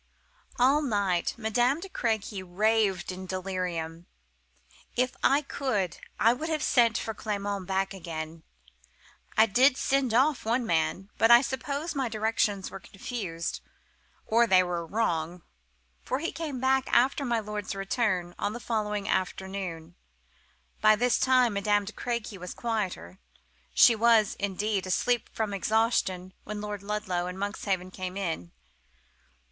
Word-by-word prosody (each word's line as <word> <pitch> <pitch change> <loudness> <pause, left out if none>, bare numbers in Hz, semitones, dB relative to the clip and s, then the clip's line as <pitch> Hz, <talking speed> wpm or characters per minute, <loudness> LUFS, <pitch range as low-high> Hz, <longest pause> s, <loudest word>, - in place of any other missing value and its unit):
"All 270 +4 +4
night 200 - 0
Madame 240 +6 +1
de 385 - -7
Crequy 220 - -2
raved 195 0 +1
in 185 0 -7
delirium. 180 -3 -4 0.9
If 250 +1 0
I 285 +2 +4
could 215 - -2 0.2
I 230 +2 +5
would 310 +6 -4
have 310 -2 -1
sent 230 -3 +4
for 220 - -3
Clement 200 -3 -3
back 195 0 0
again. 165 -3 -6 1.0
I 220 - +8
did 255 +5 +4
send 270 -3 +1
off 275 +3 +3
one 235 +2 0
man, 185 +3 0
but 225 - +5
I 235 0 +9
suppose 280 +5 -3
my 270 -4 -1
directions 215 -3 0
were 195 - -7
confused, 190 -5 -5 0.6
or 235 +1 +3
they 185 -3 +6
were 175 -1 -2
wrong, 170 -3 -1 0.6
for 260 - -2
he 330 +5 -3
came 305 -6 -4
back 265 +1 +2
after 270 +3 +3
my 240 -3 +1
lord's 210 -2 -5
return, 195 -3 -1
on 205 - -1
the 240 - -6
following 210 -3 -2
afternoon. 185 -4 -3 0.9
By 215 0 +6
this 245 +2 +2
time 255 -3 +4
Madame 205 0 +1
de 215 - -7
Crequy 235 -5 -4
was 180 0 -7
quieter: 195 - -3 0.6
she 235 - +7
was, 225 -2 +4
indeed, 200 0 -1
asleep 240 +6 +1
from 215 -2 -2
exhaustion 195 -3 0
when 210 0 -5
Lord 210 -1 -5
Ludlow 200 -4 -2
and 180 +1 -6
Monkshaven 195 -2 -2
came 185 0 -5
in. 165 - -3
210 Hz, 140 wpm, -28 LUFS, 185-235 Hz, 1.0 s, I